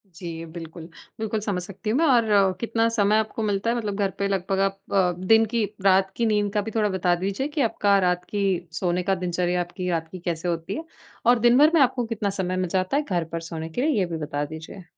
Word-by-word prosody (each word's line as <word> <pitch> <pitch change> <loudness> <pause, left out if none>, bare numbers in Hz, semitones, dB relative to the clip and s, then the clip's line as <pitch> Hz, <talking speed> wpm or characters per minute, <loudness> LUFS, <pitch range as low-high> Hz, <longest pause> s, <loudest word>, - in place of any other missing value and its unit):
जी, 165 -1 -6
बिल्कुल। 165 0 -9 0.3
बिल्कुल 220 0 -2
समझ 200 -4 -2
सकती 195 +4 -6
हूँ 240 - +2
मैं 330 - +3
और 245 -4 +4
अ, 195 -2 +4
कितना 230 0 +1
समय 215 -2 +2
आपको 220 +1 -2
मिलता 210 +1 0
है? 235 - 0
मतलब 210 -4 -2
घर 200 -1 0
पे 200 - 0
लगभग 195 0 -1
आप 195 0 0
अ, 185 -3 +3
दिन 225 +2 +6
की 230 -2 +2 0.2
रात 190 0 +4
की 235 - +1
नींद 210 -2 +1
का 210 - +3
भी 220 - -5
थोड़ा 215 -2 +2
बता 180 -2 +1
दीजिए 200 +8 -1
कि 300 0 -3
आपका 205 -3 +2
रात 180 0 0
की, 195 -4 -1
सोने 175 +2 -1
का 195 +2 +1
दिनचर्या, 180 -1 -1
आपकी 180 +1 -4
रात 165 -1 -1
की 185 - -6
कैसे 170 0 -2
होती 170 +2 -2
है। 320 - -5 0.4
और 245 0 +6
दिन 240 +2 +5
भर 300 +2 +7
में 320 - +5
आपको 250 -2 +3
कितना 210 -3 -2
समय 185 0 -1
मिल 185 -1 -1
जाता 185 +7 0
है, 295 - +2
घर 180 - -1
पर 165 - -2
सोने 160 0 -5
के 165 - -4
लिए 295 -5 +2
ये 185 - +2
भी 170 - -4
बता 145 -1 -2
दीजिए। 160 +5 -9
195 Hz, 250 wpm, -24 LUFS, 175-220 Hz, 0.4 s, भर